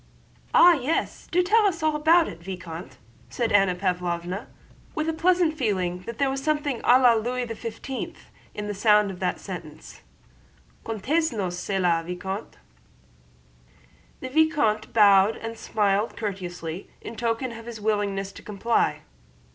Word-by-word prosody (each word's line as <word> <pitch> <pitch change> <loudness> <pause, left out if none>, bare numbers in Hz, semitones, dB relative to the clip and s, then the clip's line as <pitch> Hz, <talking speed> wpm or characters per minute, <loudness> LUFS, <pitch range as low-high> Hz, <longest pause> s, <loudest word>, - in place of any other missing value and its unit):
"Ah, 350 0 +8
yes! 300 +1 -2
Do 360 +1 +2
tell 420 +3 +4
us 335 -5 -2
all 310 -1 +2
about 320 +3 +4
it, - - -8
Vicomte," 170 -2 -8 0.3
said 235 -2 -1
Anna 195 -3 +4
Pávlovna, 180 0 -2 0.5
with 310 +1 -1
a 325 - 0
pleasant 345 -1 +2
feeling 190 - -1
that 235 -1 -6
there 275 - +2
was 270 0 -4
something 295 -4 -1
à 250 +1 +5
la 250 -2 +6
Louis 245 +3 -1
XV 230 +3 -6 0.4
in 210 - -4
the 205 - -3
sound 210 0 +3
of 180 - -10
that 180 -1 -1
sentence: 165 -6 -9 0.8
"Contez 280 - 0
nous 195 -6 -2
çela, 180 -2 0
Vicomte." 190 +4 -6 1.6
The 260 - -5
vicomte 285 -8 +2
bowed 205 -1 +5
and 225 0 -6
smiled 210 -1 0
courteously 180 -4 -5
in 230 - -8
token 235 +2 -1
of 230 0 -10
his 235 -2 -7
willingness 205 -2 -1
to - - -12
comply. 215 +3 0
220 Hz, 145 wpm, -25 LUFS, 190-270 Hz, 1.6 s, Ah